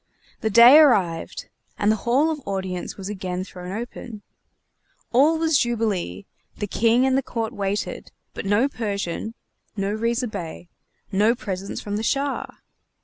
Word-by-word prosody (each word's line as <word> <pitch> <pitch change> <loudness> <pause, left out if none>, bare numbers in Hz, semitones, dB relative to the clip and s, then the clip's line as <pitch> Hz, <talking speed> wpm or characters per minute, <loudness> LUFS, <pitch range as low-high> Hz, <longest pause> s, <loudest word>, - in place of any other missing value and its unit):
The 220 - -1
day 235 +7 +9
arrived, 185 - +2 0.3
and 210 +1 +3
the - - +3
Hall 280 +7 +3
of 300 -2 -4
Audience 190 -2 -4
was 195 -1 -6
again 185 -3 -4
thrown 180 -1 -9
open. 225 0 -7 0.9
All 290 +7 +4
was 320 -3 +2
jubilee; 210 - -1 0.3
the 205 - -2
King 230 +5 +3
and 265 -1 +2
the 270 - +3
court 230 -2 -4
waited, 200 -1 -3 0.2
but - - -5
no 205 +7 +3
Persian 215 -3 -4 0.4
no 200 +1 -1
Riza 230 +3 0
Bey 175 -4 -7 0.4
no 210 +4 +3
presents 195 -4 -5
from 205 0 -3
the 220 - -3
Shah! 280 +4 -1
215 Hz, 145 wpm, -23 LUFS, 195-245 Hz, 0.9 s, day